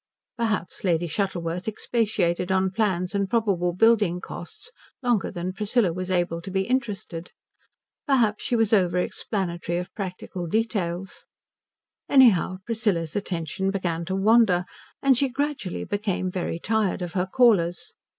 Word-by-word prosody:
Perhaps 220 Hz, -6 st, -2 dB
Lady 175 Hz, -3 st, +2 dB
Shuttleworth 175 Hz, 0 st, -2 dB
expatiated 205 Hz, -5 st, 0 dB
on 190 Hz, 0 st, +2 dB
plans 190 Hz, -3 st, 0 dB
and 200 Hz, -1 st, 0 dB
probable 200 Hz, -7 st, +1 dB
building 205 Hz, -2 st, +3 dB
costs 305 Hz, -, -9 dB, 0.3 s
longer 240 Hz, -5 st, +1 dB
than 180 Hz, 0 st, -4 dB
Priscilla 210 Hz, -2 st, +1 dB
was 185 Hz, +1 st, -4 dB
able 175 Hz, -2 st, 0 dB
to 180 Hz, -, -7 dB
be 190 Hz, 0 st, 0 dB
interested; 205 Hz, -8 st, -3 dB, 0.8 s
perhaps 230 Hz, -6 st, +2 dB
she 245 Hz, -, 0 dB
was 225 Hz, -2 st, +2 dB
over 180 Hz, -4 st, +3 dB
explanatory 175 Hz, -2 st, -2 dB
of 180 Hz, +2 st, -5 dB
practical 180 Hz, -2 st, -5 dB
details; 195 Hz, -3 st, -2 dB, 0.8 s
anyhow 225 Hz, -9 st, +5 dB
Priscilla's 210 Hz, -9 st, -1 dB
attention 190 Hz, -1 st, -2 dB
began 175 Hz, -4 st, -2 dB
to 190 Hz, +2 st, -2 dB
wander, 195 Hz, -3 st, +4 dB, 0.4 s
and 265 Hz, -3 st, +5 dB
she 275 Hz, -, +2 dB
gradually 280 Hz, -8 st, -3 dB
became 200 Hz, -3 st, -2 dB
very 180 Hz, -2 st, -2 dB
tired 210 Hz, -1 st, 0 dB
of 175 Hz, -, -5 dB
her 180 Hz, -1 st, 0 dB
callers. 190 Hz, -7 st, +2 dB
190 Hz, 135 wpm, -25 LUFS, 175-220 Hz, 0.8 s, anyhow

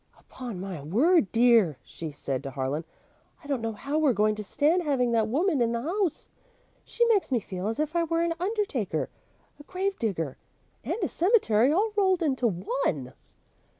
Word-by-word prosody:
"Upon 245 Hz, -7 st, -8 dB
my 185 Hz, -5 st, -6 dB
word, 230 Hz, -, +3 dB
dear," 230 Hz, -, +4 dB
she 165 Hz, -2 st, -7 dB
said 140 Hz, -3 st, -4 dB
to 140 Hz, -, -6 dB
Harlan, 135 Hz, +4 st, -3 dB, 0.6 s
"I -, -, -17 dB
don't 275 Hz, -4 st, -1 dB
know 225 Hz, 0 st, -2 dB
how 280 Hz, +8 st, -2 dB
we're 295 Hz, -5 st, +3 dB
going 215 Hz, +1 st, +2 dB
to 210 Hz, 0 st, -6 dB
stand 305 Hz, -, +2 dB
having 265 Hz, -7 st, +1 dB
that 225 Hz, -2 st, +2 dB
woman 300 Hz, -, +1 dB
in 235 Hz, 0 st, +2 dB
the 235 Hz, -, -1 dB
house. 360 Hz, +1 st, -1 dB, 0.6 s
She 475 Hz, -, +1 dB
makes 430 Hz, -9 st, +2 dB
me 245 Hz, -, +3 dB
feel 190 Hz, -1 st, -5 dB
as 225 Hz, +4 st, -3 dB
if 305 Hz, +2 st, -1 dB
I 340 Hz, -1 st, +2 dB
were 330 Hz, +1 st, 0 dB
an 340 Hz, 0 st, 0 dB
undertaker, 370 Hz, -, -1 dB, 0.5 s
a -, -, -11 dB
grave 380 Hz, +4 st, -3 dB
digger, 165 Hz, -, -2 dB, 0.5 s
and -, -, -2 dB
a -, -, +2 dB
cemetery, 290 Hz, -, +3 dB
all 415 Hz, +7 st, +1 dB
rolled 380 Hz, -4 st, +2 dB
into 260 Hz, -5 st, +1 dB
one." 175 Hz, -, -2 dB
250 Hz, 185 wpm, -27 LUFS, 200-335 Hz, 0.6 s, dear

